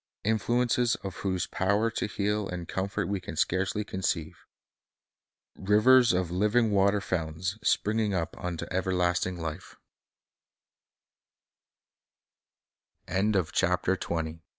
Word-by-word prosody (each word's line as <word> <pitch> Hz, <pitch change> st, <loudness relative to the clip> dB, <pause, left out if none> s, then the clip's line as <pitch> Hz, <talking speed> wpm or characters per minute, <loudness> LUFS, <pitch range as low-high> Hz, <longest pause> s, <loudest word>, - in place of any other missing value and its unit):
— -, -, -66 dB
influences 120 Hz, +3 st, +1 dB
of 95 Hz, -2 st, -6 dB
whose 95 Hz, -2 st, -1 dB
power 105 Hz, +4 st, +1 dB
to -, -, -2 dB
heal 105 Hz, 0 st, -1 dB
and 90 Hz, -2 st, -5 dB
comfort 100 Hz, 0 st, -2 dB
we 100 Hz, 0 st, -1 dB
can 85 Hz, -2 st, -7 dB
scarcely 95 Hz, +6 st, 0 dB
conceive, 90 Hz, -5 st, -3 dB, 0.6 s
— -, -, -66 dB
rivers 115 Hz, +5 st, +5 dB
of 90 Hz, -2 st, 0 dB
living 105 Hz, +5 st, +2 dB
water 100 Hz, +1 st, +3 dB
fountains 90 Hz, +2 st, -3 dB
"springing 105 Hz, 0 st, +1 dB
up 85 Hz, -4 st, -2 dB
unto 90 Hz, -2 st, -3 dB
everlasting 90 Hz, -1 st, 0 dB
li 80 Hz, +1 st, -4 dB
95 Hz, 100 wpm, -28 LUFS, 90-105 Hz, 0.6 s, rivers